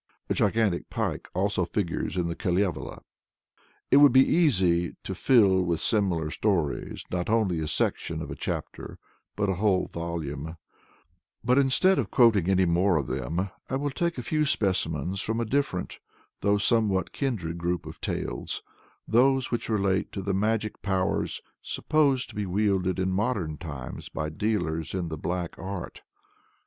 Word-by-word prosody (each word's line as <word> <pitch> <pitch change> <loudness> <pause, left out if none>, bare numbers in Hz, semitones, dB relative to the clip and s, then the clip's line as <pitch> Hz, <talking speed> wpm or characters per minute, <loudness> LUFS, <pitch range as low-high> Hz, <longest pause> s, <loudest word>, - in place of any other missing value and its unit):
A - - +5
gigantic 105 -3 +1
pike - - -3 0.4
figures 95 -2 -2
also - - +2
in - - -2
the 85 - -3
Kalevala. 90 -2 -1 0.9
It 135 - +7
would 145 0 +8
be 130 +2 +6
easy 95 - +2
to - - -4
fill 100 -7 +4
with 85 -2 0
similar 90 -8 +1
stories, 85 -9 -1
not 90 +1 -2
only 105 -7 +2
a 80 - -2
section 75 - 0
of - - -6
a - - -4
chapter, - - -5 0.4
but 105 -1 0
a 95 - +1
whole 100 -4 +3
volume; 80 -2 -5 0.9
but 125 +3 +4
instead 140 +8 +4
of - - -1
quoting 110 - +4
any 95 -1 +4
more 90 +1 +3
of 70 - -1
them, 80 +11 -2 0.2
I 130 - -1
will 145 +1 -1
take 170 +4 -1
a 125 - -4
few 155 +5 +1
specimens 95 - 0
from 110 +2 -2
a 115 - 0
different, 120 -7 -1 0.4
though 100 0 +2
a - - 0
somewhat 100 -4 +2
kindred 90 - -3
group 85 +1 -2
of - - -10
tales - - -3 0.4
those 130 +3 +3
which 120 - -2
relate 100 -3 +1
to 95 - -4
the 100 +1 -1
magic 110 +2 -1
powers 95 -2 -1 0.2
supposed 140 -5 +1
to - - -12
be 105 -1 -2
wielded 95 -1 +1
in 95 0 0
modern 95 - -1
times 70 -7 -7
by 75 0 -3
dealers 80 -3 -2
in 90 -3 -2
the 80 - -4
Black 90 0 -2
Art. 95 -1 -6
95 Hz, 160 wpm, -27 LUFS, 85-115 Hz, 0.9 s, would